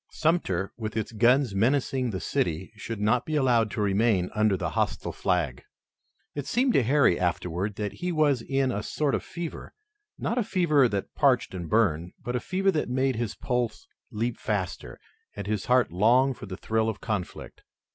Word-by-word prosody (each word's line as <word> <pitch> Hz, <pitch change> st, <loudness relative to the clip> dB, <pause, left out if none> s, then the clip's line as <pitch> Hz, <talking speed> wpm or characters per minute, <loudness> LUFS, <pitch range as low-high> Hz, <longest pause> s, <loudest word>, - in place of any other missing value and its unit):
Sumter 155 Hz, -, 0 dB
with 110 Hz, -1 st, -4 dB
its 110 Hz, -, -2 dB
guns 120 Hz, +2 st, +3 dB
menacing 130 Hz, +4 st, +1 dB
the 95 Hz, -4 st, -3 dB
city 85 Hz, +4 st, -2 dB
should 110 Hz, 0 st, -6 dB
not 110 Hz, +5 st, +2 dB
be 155 Hz, -, -3 dB
allowed 120 Hz, -6 st, +3 dB
to 105 Hz, -, -3 dB
remain 100 Hz, -2 st, +2 dB
under 105 Hz, -2 st, +2 dB
the -, -, -3 dB
hostile -, -, -1 dB
flag. 90 Hz, -9 st, -1 dB, 0.7 s
It 145 Hz, -1 st, -5 dB
seemed 250 Hz, -, +2 dB
to -, -, +4 dB
Harry 130 Hz, -6 st, +3 dB
afterward 90 Hz, +2 st, -1 dB
that 105 Hz, -2 st, -3 dB
he 180 Hz, 0 st, -3 dB
was 150 Hz, -6 st, +2 dB
in 135 Hz, +1 st, 0 dB
a 105 Hz, -, -2 dB
sort 145 Hz, +6 st, -1 dB
of -, -, -1 dB
fever, 170 Hz, -1 st, -7 dB, 0.4 s
not 235 Hz, +3 st, -1 dB
a -, -, +2 dB
fever 155 Hz, -9 st, +3 dB
that 100 Hz, -2 st, -3 dB
parched 130 Hz, -7 st, +2 dB
and 85 Hz, -3 st, -5 dB
burned, 90 Hz, -6 st, +1 dB
but 120 Hz, -, -3 dB
a -, -, +1 dB
fever 190 Hz, +7 st, +1 dB
that 150 Hz, -7 st, -1 dB
made 130 Hz, +1 st, +1 dB
his 115 Hz, -3 st, -2 dB
pulse 125 Hz, -, -2 dB, 0.2 s
leap 115 Hz, +1 st, -2 dB
faster, 95 Hz, -4 st, -3 dB, 0.4 s
and 100 Hz, -, -5 dB
his 105 Hz, -1 st, -2 dB
heart 125 Hz, -4 st, +3 dB
long 120 Hz, +9 st, +4 dB
for 105 Hz, -, -10 dB
the 95 Hz, -1 st, -6 dB
thrill 110 Hz, +1 st, 0 dB
of 110 Hz, -, -5 dB
conflict. 105 Hz, -5 st, -5 dB
115 Hz, 185 wpm, -27 LUFS, 100-135 Hz, 0.7 s, to